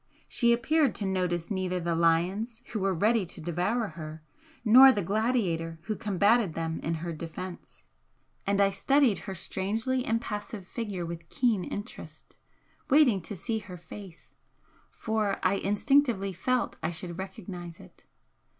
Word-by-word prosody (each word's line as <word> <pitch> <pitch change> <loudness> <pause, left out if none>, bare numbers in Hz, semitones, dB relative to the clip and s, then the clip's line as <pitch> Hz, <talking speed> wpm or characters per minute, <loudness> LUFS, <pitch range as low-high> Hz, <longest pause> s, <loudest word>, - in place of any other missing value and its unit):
She 235 -2 +2
appeared 275 +3 +2
to 205 - -3
notice 180 -2 -1
neither 185 -2 -1
the 170 0 -1
lions 180 +8 +1
who 215 - -1
were 195 0 +1
ready 210 +5 +2
to - - -9
devour 180 +8 -1
her, 155 -1 -8 0.4
nor 260 +5 +9
the 205 -6 -1
gladiator 190 -5 0
who 215 +3 -2
combated 205 -2 +2
them 165 -1 -2
in 165 +1 -2
her 170 - -3
defence 170 +3 -8 0.6
and 200 0 +2
I 200 0 +4
studied 260 +3 +3
her 190 - -4
strangely 220 +8 -1
impassive 215 -3 -3
figure 200 -4 -4
with 170 0 -7
keen 230 -7 +1
interest, 205 +6 -8 0.5
waiting 265 -9 +5
to 170 +5 -6
see 220 +5 -2
her 185 -4 -10
face, 175 +1 -12 0.6
for 215 -3 -1
I 185 +2 +3
instinctively 205 -1 +2
felt 255 +7 -1
I 160 - -1
should 175 +1 -6
recognise 180 -4 -7
it. - - -16
195 Hz, 145 wpm, -28 LUFS, 175-225 Hz, 0.6 s, nor